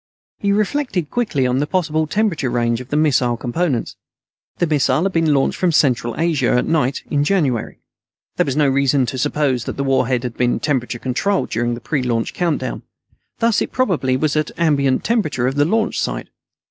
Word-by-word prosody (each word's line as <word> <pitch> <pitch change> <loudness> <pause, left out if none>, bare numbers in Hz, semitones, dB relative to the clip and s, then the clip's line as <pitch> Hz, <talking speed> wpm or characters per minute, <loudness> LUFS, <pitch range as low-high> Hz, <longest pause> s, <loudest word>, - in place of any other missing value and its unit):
He 200 - 0
reflected 210 - -1
quickly 200 - 0
on 125 +1 +1
the 145 - 0
possible 155 -4 0
temperature 190 - 0
range 120 0 0
of 125 - -10
the 145 - 0
missile 130 -6 +2
components. 130 +1 -2 0.6
The 175 - +1
missile 145 -2 +1
had 195 - 0
been 165 -2 +2
launched 140 -2 +1
from 180 -2 +2
Central 125 -6 +1
Asia, 160 -6 +1
at 125 - +2
night, 145 -4 0
in 145 -1 +2
January. 145 - 0 0.6
There - - +3
was 135 - -1
no 150 -2 +4
reason 135 0 +2
to 130 +2 -4
suppose 130 -3 0
that - - -5
the 140 - -1
warhead 130 -2 +1
had 125 -2 -4
been 125 0 +1
temperature 125 -5 -1
controlled 135 +12 -1
during 120 +1 0
the 120 - -10
pre 145 -4 -1
launch 115 -2 -1
countdown. 150 -8 -2 0.6
Thus 230 -2 +2
it - - -2
probably 160 - +1
was 150 +2 0
at 155 -1 +1
the - - -12
ambient 140 -5 +2
temperature 155 - 0
of 130 - +1
the 145 +1 +2
launch 220 +6 0
site. - - -3
145 Hz, 195 wpm, -19 LUFS, 125-165 Hz, 0.6 s, no